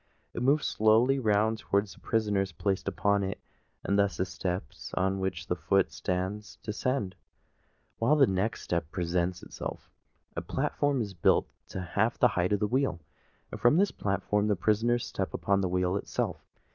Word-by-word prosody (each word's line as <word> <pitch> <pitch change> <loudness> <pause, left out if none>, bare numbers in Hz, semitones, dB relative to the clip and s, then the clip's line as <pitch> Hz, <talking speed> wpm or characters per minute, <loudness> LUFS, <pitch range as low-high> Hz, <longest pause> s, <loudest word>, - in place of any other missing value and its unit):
It - - -4
moves 140 +4 +3
slowly 115 +5 +4
round 110 -1 +2
towards 100 0 0
the - - -18
prisoners 105 -4 0
placed 100 -1 -2
upon 100 -1 +1
it; 95 0 -3 0.4
and 100 +1 +1
thus 100 -1 +2
the 95 - +1
step 90 0 -3 0.3
on 95 +1 +1
which 95 -4 -2
the - - -1
foot - - +2
stands 95 +3 -3
descends, 105 -3 -2 0.8
while 125 +7 +4
the 145 -3 +6
next 95 +2 -1
step 85 -3 -2
presents 90 0 -1
itself. - - -7 0.4
A - - -2
platform 145 -3 0
is 100 -2 -7
built 85 - +3 0.2
to 95 - -5
half 90 - 0
the - - +5
height 90 +1 0
of 105 - +2
the - - +3
wheel; 130 -7 0 0.5
and - - -7
from 120 +6 +5
this 200 +2 +3
platform 105 +1 0
the 105 - +2
prisoners 115 +6 +1
step 95 - -3
upon 100 0 +1
the 95 - 0
wheel 90 +1 +1
itself. 100 - -2
100 Hz, 170 wpm, -29 LUFS, 95-110 Hz, 0.8 s, the